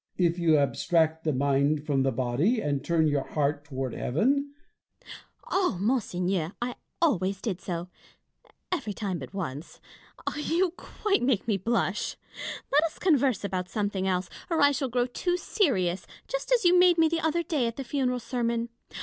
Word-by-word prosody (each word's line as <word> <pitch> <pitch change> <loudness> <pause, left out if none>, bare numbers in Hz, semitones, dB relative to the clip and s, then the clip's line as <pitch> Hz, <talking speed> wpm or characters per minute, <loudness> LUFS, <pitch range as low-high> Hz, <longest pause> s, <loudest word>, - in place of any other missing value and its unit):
If 175 -1 +2
you 160 -3 +4
abstract 160 +3 +1
the 155 - +2
mind 140 +2 +1
from 140 -3 +1
the 135 0 +2
body, 130 - +1
and 145 -8 -1
turn 165 -2 +2
your 145 -2 +1
heart 145 -1 -1
toward 135 -3 -4
heaven 280 - 0 0.4
Fontanges. - - -12 0.4
O 370 - +2
monseigneur, 185 -6 0
I 240 +1 -2 0.3
always 195 - +1
did 190 -4 -3
so 175 -1 -4 0.5
— - - -32
every 225 - -2
time 195 -4 -3
but 130 - -8
once 165 -6 -6 0.3
— - - -6
you 335 +4 +1
quite 405 +1 -1
make 245 -4 +1
me 210 -3 +2
blush. 195 -2 -1 0.5
Let 295 +2 +5
us 325 - -5
converse 275 - +2
about 185 -2 -2
something 200 -2 -1
else, 185 -1 0 0.2
or 330 -2 +1
I 285 0 +6
shall 270 -1 -1
grow 245 +1 +1
too 355 +8 -1
serious, 195 - 0 0.2
just - - -4
as 485 -6 +3
you 355 +1 +6
made 360 -1 +6
me 325 -1 +5
the 330 +1 -1
other 320 +2 +1
day 300 -8 0
at 230 - -4
the 270 - -4
funeral 250 -1 0
sermon. 235 -1 -1
205 Hz, 175 wpm, -28 LUFS, -, 0.5 s, I